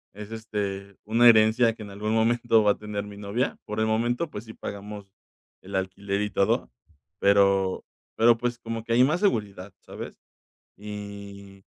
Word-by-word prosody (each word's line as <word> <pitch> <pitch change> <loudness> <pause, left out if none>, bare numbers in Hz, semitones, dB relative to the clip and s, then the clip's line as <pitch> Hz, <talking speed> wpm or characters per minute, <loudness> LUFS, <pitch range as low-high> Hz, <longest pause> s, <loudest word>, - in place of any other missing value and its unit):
es, 105 +1 -9
este, 100 -3 -4
una 115 +3 +5
herencia 115 +1 +5
que 110 - -13
en 105 - -8
algún 105 +2 -3
momento 115 0 +3
va 105 - +5
a - - -15
tener 105 -1 -5
mi 100 0 -10
novia. 105 +5 -2
Por 105 +1 -4
el 110 - +2
momento, 120 +8 0
pues, 105 -4 -7
sí 110 - -10
pagamos 100 -1 -8 0.5
el 100 +1 -12
alquiler 100 +1 -2
y 105 - -1
todo, 100 - 0 0.5
pero, 100 -1 +3 0.3
pero, 115 +1 +5
pues, 120 0 -2
como 115 -1 -5
que 115 - -2
hay 125 +2 +6
más 155 +8 +1
seguridad, 100 - -1
¿sabes? - - -9 0.6
Y, 100 -1 -9
105 Hz, 170 wpm, -26 LUFS, 100-115 Hz, 0.6 s, hay